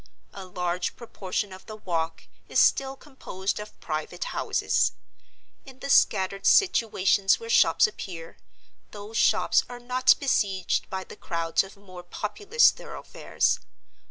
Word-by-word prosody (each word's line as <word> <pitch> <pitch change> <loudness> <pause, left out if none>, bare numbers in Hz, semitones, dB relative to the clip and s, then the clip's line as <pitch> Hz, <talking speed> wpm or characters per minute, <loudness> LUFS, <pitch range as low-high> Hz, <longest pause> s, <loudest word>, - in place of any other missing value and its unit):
A 195 -1 -9
large 180 0 -3
proportion 200 -4 -4
of 185 - -13
the 215 - -7
Walk 165 -5 -3 0.3
is - - +2
still 270 0 +3
composed 210 -10 -5
of 210 0 -10
private 155 -1 -4
houses. - - 0 0.7
In 265 -2 -14
the 275 +1 -4
scattered 195 -3 +3
situations 205 - +3
where 460 0 -6
shops - - +5
appear, 175 - -7 0.5
those 210 +1 -10
shops - - +3
are 245 0 -8
not 250 +1 +3
besieged 195 -9 0
by 190 0 -4
the - - -12
crowds 165 0 -1
of 195 +1 -13
more 185 -3 -12
populous 400 - +2
thoroughfares. - - -2
195 Hz, 130 wpm, -26 LUFS, 185-250 Hz, 0.7 s, shops